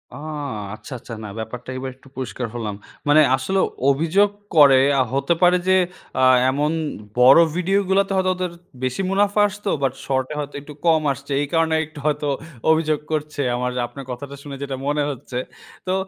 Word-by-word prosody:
আ -, -, -8 dB, 0.6 s
আচ্ছা, 130 Hz, -, -10 dB
আচ্ছা, 120 Hz, -, -10 dB
না 105 Hz, -, -6 dB
ব্যাপারটা 120 Hz, +3 st, -7 dB
এবার 130 Hz, 0 st, -4 dB
একটু 135 Hz, +1 st, -21 dB
পরিষ্কার 125 Hz, -1 st, -4 dB
হলাম। 105 Hz, -4 st, -3 dB, 0.3 s
মানে 145 Hz, +1 st, +6 dB, 0.2 s
আসলে 190 Hz, +9 st, -1 dB, 0.3 s
অভিযোগ 165 Hz, +8 st, +3 dB, 0.3 s
করে 140 Hz, -3 st, +8 dB, 0.2 s
আ -, -, +5 dB
হতে 140 Hz, +5 st, +2 dB
পারে 180 Hz, 0 st, +6 dB
যে, 185 Hz, -, +5 dB, 0.5 s
আ -, -, +4 dB, 0.3 s
এমন 145 Hz, +3 st, 0 dB, 0.5 s
বড় 130 Hz, +5 st, +8 dB, 0.2 s
ভিডিও 190 Hz, +3 st, +2 dB
গুলাতে 195 Hz, +1 st, +2 dB
হয়তো 185 Hz, 0 st, +2 dB
ওদের 180 Hz, -1 st, -3 dB, 0.3 s
বেশি 130 Hz, +7 st, -1 dB
মুনাফা 205 Hz, +1 st, +2 dB
আসতো 205 Hz, 0 st, -5 dB
বাট 130 Hz, -1 st, +1 dB
শর্ট 130 Hz, -1 st, 0 dB
এ -, -, -6 dB
হয়তো 145 Hz, -1 st, -5 dB
একটু 150 Hz, +1 st, -11 dB
কম 160 Hz, -2 st, +4 dB
আসছে। 140 Hz, +2 st, -11 dB
এই 145 Hz, -, -1 dB
কারণে 165 Hz, -1 st, +2 dB
একটু 155 Hz, 0 st, -12 dB
হয়তো 150 Hz, -1 st, 0 dB, 0.4 s
অভিযোগ 155 Hz, -2 st, +2 dB
করছে 150 Hz, -1 st, -2 dB
আমার 125 Hz, 0 st, -1 dB, 0.2 s
আপনার 130 Hz, +2 st, -10 dB
কথাটা 140 Hz, +3 st, -7 dB
শুনে 140 Hz, -2 st, -7 dB
যেটা 135 Hz, -1 st, -3 dB
মনে 145 Hz, 0 st, +1 dB
হচ্ছে। 130 Hz, -2 st, -6 dB, 0.5 s
তো 185 Hz, -, +1 dB
145 Hz, 180 wpm, -22 LUFS, 130-170 Hz, 0.6 s, করে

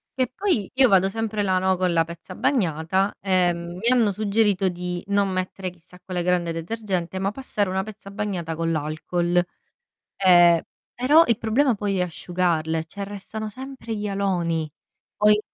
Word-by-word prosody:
che 255 Hz, -2 st, 0 dB
poi 360 Hz, -, 0 dB
io 260 Hz, 0 st, +5 dB
vado 195 Hz, 0 st, +4 dB
sempre 215 Hz, -1 st, -2 dB
là, 185 Hz, -1 st, +2 dB
no, 190 Hz, 0 st, +1 dB
con 180 Hz, -2 st, +1 dB
la 165 Hz, -1 st, +4 dB
pezza 170 Hz, +2 st, -10 dB
bagnata, 190 Hz, -, 0 dB
ehm, 175 Hz, -2 st, +1 dB
mi 225 Hz, +5 st, -2 dB
hanno 235 Hz, -5 st, +4 dB
suggerito 205 Hz, -1 st, +1 dB
di 180 Hz, 0 st, -4 dB
non 200 Hz, -1 st, +2 dB
mettere 185 Hz, 0 st, -3 dB
chissà 180 Hz, +1 st, -18 dB
quella 180 Hz, -2 st, -3 dB
grande 175 Hz, -2 st, +1 dB
detergente, 185 Hz, 0 st, -3 dB
ma 195 Hz, +1 st, 0 dB
passare 210 Hz, -6 st, -2 dB
una 190 Hz, +1 st, -1 dB
pezza 215 Hz, -1 st, -10 dB
bagnata 195 Hz, -6 st, -3 dB
con 165 Hz, 0 st, -1 dB
l'alcol. 170 Hz, +3 st, 0 dB, 0.8 s
Ehm, 175 Hz, -3 st, +6 dB, 0.3 s
però 290 Hz, +7 st, +5 dB
il 230 Hz, -2 st, +2 dB
problema 245 Hz, +3 st, +2 dB
poi 200 Hz, -2 st, -1 dB
è -, -, +2 dB
asciugarle, 165 Hz, -2 st, -1 dB
cioè 200 Hz, +4 st, -7 dB
restano 205 Hz, +2 st, -6 dB
sempre 255 Hz, 0 st, -7 dB
gli 210 Hz, 0 st, -3 dB
aloni. 175 Hz, -5 st, -1 dB, 0.5 s
Poi 210 Hz, 0 st, +4 dB
190 Hz, 160 wpm, -24 LUFS, 175-210 Hz, 0.8 s, Ehm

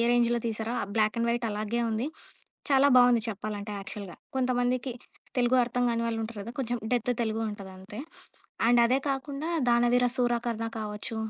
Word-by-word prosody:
రేంజ్‌లో 240 Hz, 0 st, +3 dB
తీశారో? 225 Hz, +1 st, -2 dB
ఆ -, -, -1 dB
black 215 Hz, 0 st, +2 dB
and 235 Hz, -, +1 dB
white 235 Hz, 0 st, 0 dB
అలాగే 215 Hz, +3 st, -2 dB
ఉంది. 225 Hz, +5 st, -1 dB, 0.6 s
చాలా 275 Hz, +1 st, +6 dB
బావుంది 245 Hz, -2 st, +6 dB
చెప్పాలంటే 210 Hz, 0 st, -4 dB
యాక్చల్‌గా. 195 Hz, -1 st, -7 dB, 0.2 s
కొంతమందికి 250 Hz, 0 st, +1 dB, 0.5 s
తెలుగు 245 Hz, +1 st, +3 dB
అర్థం 245 Hz, +1 st, -1 dB
కాని 230 Hz, 0 st, 0 dB
వాళ్ళుంటారు 225 Hz, -1 st, -3 dB
కదా! 230 Hz, -, -7 dB
కొంచుం 245 Hz, -2 st, -1 dB, 0.2 s
డెత్ 245 Hz, 0 st, +1 dB
తెలుగుంటదంతే. 210 Hz, -2 st, -4 dB, 0.7 s
అండ్ 240 Hz, 0 st, +6 dB
అదే 255 Hz, +3 st, +3 dB
కాకుండా 275 Hz, +3 st, -3 dB, 0.2 s
'దానవీరసూరకర్ణ' 240 Hz, -1 st, +2 dB
కావచ్చు, 210 Hz, +1 st, -5 dB
235 Hz, 140 wpm, -28 LUFS, 215-245 Hz, 0.7 s, చాలా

